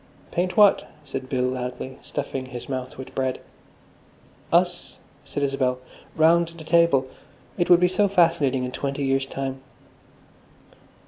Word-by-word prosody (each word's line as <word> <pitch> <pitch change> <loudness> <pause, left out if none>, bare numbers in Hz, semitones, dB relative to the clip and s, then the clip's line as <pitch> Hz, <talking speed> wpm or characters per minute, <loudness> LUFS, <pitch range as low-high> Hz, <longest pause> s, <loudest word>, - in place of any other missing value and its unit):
"Paint 180 +4 -1
what?" 205 -2 +5 0.2
said 135 -2 -6
Bill 130 -2 0
loudly, 125 +1 -4
stuffing 130 -1 -4
his 125 -2 -8
mouth 130 -1 -5
with 130 - -9
bread. 130 -1 -1 1.1
"Us," - - +1 0.3
said 145 - -4
Isabel, 135 -2 0 0.4
"round 165 +2 +4
the 160 - -9
table. 170 -5 +3 0.5
It 175 - 0
would 175 -1 +7
be 180 - +4
so 205 +3 +2
fascinating 165 -8 +2
in 125 - -3
twenty 140 +1 -3
years' 135 0 +1
time." 135 -1 -5
135 Hz, 135 wpm, -24 LUFS, 130-170 Hz, 1.1 s, would